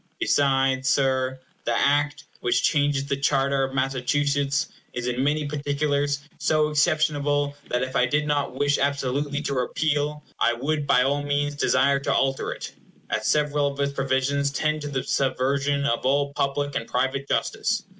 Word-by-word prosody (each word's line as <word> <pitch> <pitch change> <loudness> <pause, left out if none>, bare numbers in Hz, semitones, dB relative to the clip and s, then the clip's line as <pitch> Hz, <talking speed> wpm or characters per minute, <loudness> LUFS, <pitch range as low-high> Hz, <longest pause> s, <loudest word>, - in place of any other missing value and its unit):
Besides, 135 -1 +2
Sir, 130 -1 +1 0.2
the - - 0
Act 145 +1 +1 0.2
which 120 0 +1
changes 145 -2 +2
the 140 - -1
charter 140 -1 +1
of 135 0 -3
Massachusetts 140 +2 0 0.2
is 125 -1 -4
in 125 +1 -1
many 150 +2 +1
particulars 145 0 -1 0.2
so 155 -1 +2
exceptionable 145 -2 +1
that 125 +1 0
if 130 0 -5
I 125 - +3
did 145 +4 0
not 145 -3 -1
wish 145 +1 +1
absolutely 140 +1 -1
to 140 - -2
repeal, 150 +3 -1 0.2
I 120 - +3
would 145 +4 -2
by 125 -2 +4
all 140 +2 +1
means 145 0 -1
desire 140 -1 +2
to 140 - -1
alter 135 0 0
it, - - -6 0.4
as 105 +1 -1
several 150 -1 +2
of 140 0 -5
its 140 0 0
provisions 135 +1 0
tend 155 +2 -1
to 145 - -4
the 135 -3 -2
subversion 140 +1 0
of 115 -4 0
all 140 +2 +1
public 145 +1 -1
and 115 - -3
private 135 +2 -1
justice. - - 0
140 Hz, 165 wpm, -24 LUFS, 135-145 Hz, 0.4 s, by